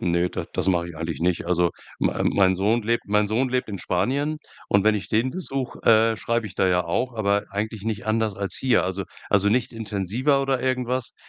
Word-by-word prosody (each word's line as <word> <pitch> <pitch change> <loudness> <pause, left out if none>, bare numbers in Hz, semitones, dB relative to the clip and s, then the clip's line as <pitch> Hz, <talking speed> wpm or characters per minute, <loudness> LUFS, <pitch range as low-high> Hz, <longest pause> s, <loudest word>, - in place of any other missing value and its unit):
ne, 85 0 +1
das - - -4
das - - -1
mach 90 -2 +2
ich 85 -2 -9
eigentlich 80 -2 -4
nicht. 85 0 0
Also 90 -1 +2 0.3
mei - - 0
mein 95 -2 +3
Sohn 110 +5 +1
lebt 115 +2 0
mein 105 +1 +2
Sohn 125 +5 +1
lebt 125 -1 -1
in 100 -3 -5
Spanien 135 - 0 0.3
und 100 - +3
wenn 110 - +4
ich 105 - -5
den 115 +4 +1
besuche, 135 -6 -5
äh, 115 0 +5
schreibe 115 +1 -1
ich - - -12
da 95 - +3
ja 90 -1 +2
auch, 125 -1 -1
aber 100 -2 +1
eigentlich 105 +1 -3
nicht 110 -3 -3
anders 110 -2 0
als 100 -1 0
hier. 130 -2 +2
Also 95 +1 -3 0.3
also 100 0 +3
nicht 115 +3 +1
intensiver 115 +6 0
oder 135 -2 0
irgendwas, 130 -1 0
110 Hz, 215 wpm, -24 LUFS, 95-125 Hz, 0.3 s, äh